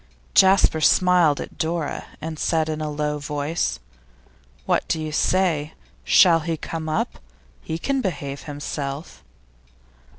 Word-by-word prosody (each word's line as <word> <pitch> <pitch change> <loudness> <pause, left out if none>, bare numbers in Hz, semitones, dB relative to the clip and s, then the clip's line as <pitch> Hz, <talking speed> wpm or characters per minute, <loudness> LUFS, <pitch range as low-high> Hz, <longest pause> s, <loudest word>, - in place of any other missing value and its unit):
Jasper 190 -4 +5
smiled 175 -3 +4
at - - -8
Dora, 160 -2 -2
and 155 0 -6
said 160 -1 +1
in 155 0 -3
a 155 - -2
low 150 0 -2
voice. 145 - -2 0.9
'What - - +1
do 160 - 0
you 155 -1 -4
say? 160 -2 +1 0.3
Shall 165 - +6
he 165 0 -3
come 160 0 -5
up? 155 - -2 0.4
He 160 - -4
can 270 +9 -1
behave 140 - -4
himself. 145 0 -6
155 Hz, 130 wpm, -23 LUFS, 150-170 Hz, 0.9 s, Shall